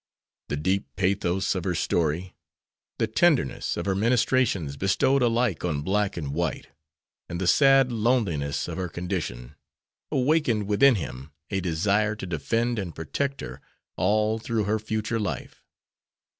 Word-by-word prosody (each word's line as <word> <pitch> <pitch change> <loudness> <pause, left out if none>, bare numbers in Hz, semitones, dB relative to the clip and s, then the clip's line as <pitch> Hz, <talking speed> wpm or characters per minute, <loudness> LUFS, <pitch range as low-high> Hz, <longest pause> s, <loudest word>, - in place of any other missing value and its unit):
The 70 - -2
deep 95 +6 0
pathos 95 0 0
of 95 -3 -3
her 90 -1 -1
story, 85 +3 -1 0.6
the - - +2
tenderness 120 - +1
of - - -3
her 100 - +1
ministrations, 110 - +1
bestowed 95 - +2
alike 115 -6 +1
on 75 -5 -1
black 100 +2 0
and 70 -4 -4
white, 85 -2 -2 0.6
and 85 - -4
the 95 - -1
sad 135 +4 +5
loneliness 105 - 0
of - - -5
her 90 -1 -2
condition, 85 -10 -4 0.6
awakened 130 -6 +2
within 110 +6 +5
him 70 -6 -6 0.2
a 95 - 0
desire 100 +5 +1
to 105 - -7
defend 115 +8 -1
and 90 -5 -5
protect 140 - -3
her 65 +1 -8 0.3
all 105 +4 +1
through 115 -1 -1
her 105 +2 0
future 110 +1 -2
life. 105 - -5
100 Hz, 145 wpm, -26 LUFS, 85-115 Hz, 0.6 s, sad